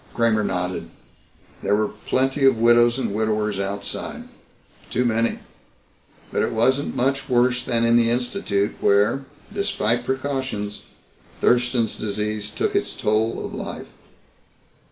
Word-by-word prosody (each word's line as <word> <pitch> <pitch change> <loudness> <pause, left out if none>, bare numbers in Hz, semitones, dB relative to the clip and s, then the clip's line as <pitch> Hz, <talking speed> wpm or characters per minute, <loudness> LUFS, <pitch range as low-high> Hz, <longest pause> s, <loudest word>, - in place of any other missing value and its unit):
Kramer 115 -2 +2
nodded. 90 -3 -2 0.7
There 105 - +2
were 105 0 +1 0.2
plenty 135 +2 +1
of 135 -3 +5
widows 120 +1 +5
and 130 - -2
widowers 105 -1 0
outside. 100 +1 -3 0.7
Too 125 - 0
many. 115 0 +1 0.9
But - - 0
it - - 0
wasn't 130 +5 +2
much 135 +2 0
worse 125 0 +2
than 115 -2 +1
in 115 0 +5
the 115 -1 +4
Institute 120 - 0
where, 105 +7 +3 0.3
despite 125 - 0
precautions, 130 -6 -3 0.5
Thurston's 120 -2 +2
disease 105 0 -2
took - - -2
its - - -1
toll 110 +2 0
of - - -7
life. - - -6
115 Hz, 125 wpm, -23 LUFS, 105-125 Hz, 0.9 s, of